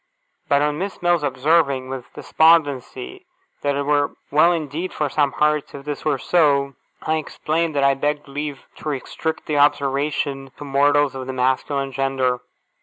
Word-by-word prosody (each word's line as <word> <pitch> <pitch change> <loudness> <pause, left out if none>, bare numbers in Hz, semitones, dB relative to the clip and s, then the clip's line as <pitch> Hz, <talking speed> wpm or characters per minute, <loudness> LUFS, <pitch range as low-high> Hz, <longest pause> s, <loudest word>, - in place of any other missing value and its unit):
But 140 +1 +4
on 150 0 0
Miss 195 +2 -4
Mills 175 -2 +3
observing, 140 -1 +1
with 130 -2 -7
despondency, 160 - +1 0.3
that 145 -1 0
it 140 - -1
were 145 0 +1 0.2
well 155 +4 +5
indeed 165 +2 -3
for 150 -2 -1
some 145 0 +1
hearts 150 -1 0
if 140 0 -9
this 145 -1 -5
were 150 -3 +1
so, 140 -3 +2 0.3
I 160 0 +1
explained 155 +1 -2
that 140 - +2
I 140 0 +5
begged 145 +2 -2
leave 145 0 -5
to 155 - -5
restrict 150 +3 -4
the 150 -2 0
observation 140 -1 0
to - - -8
mortals 145 0 +3
of 130 -1 -6
the 130 - -4
masculine 130 +2 0
gender. 130 -1 0
145 Hz, 165 wpm, -21 LUFS, 135-150 Hz, 0.3 s, well